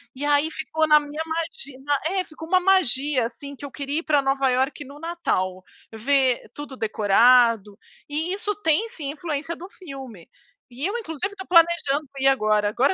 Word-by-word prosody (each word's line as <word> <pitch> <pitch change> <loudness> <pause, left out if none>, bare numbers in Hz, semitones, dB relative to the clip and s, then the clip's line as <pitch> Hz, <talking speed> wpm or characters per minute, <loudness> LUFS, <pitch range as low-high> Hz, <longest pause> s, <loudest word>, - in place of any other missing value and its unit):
E 280 - -6
aí 290 +2 +3
ficou 315 0 -1
na 300 0 +7
minha 295 +2 -6
magi 320 -4 -4 0.3
é, 375 +2 0
ficou 320 -1 -11
uma 370 +1 +4
magia 290 -9 +2
assim 280 +4 -8
que 285 - -9
eu 275 - -8
queria 285 +2 -3
ir - - -7
pra 295 -2 +3
Nova 270 0 +1
Iorque 265 +3 0
no 280 +2 -12
Natal, 245 - -2 0.3
ver 255 0 +1
tudo 290 -3 -8
decorado. 220 0 +4 0.3
E 315 +5 -2
isso 415 0 -2
tem, 325 +9 +2
sim, 290 -10 -5
influência 320 0 -4
do 360 +3 -10
filme. 265 - -10 0.4
E 270 +6 -4
eu 415 +5 -1
inclusive 385 - -4
estou 380 -1 -9
planejando 330 -4 +3
ir 270 - +2
agora. 215 -5 +3
Agora 265 - +2
290 Hz, 175 wpm, -24 LUFS, 255-325 Hz, 0.4 s, na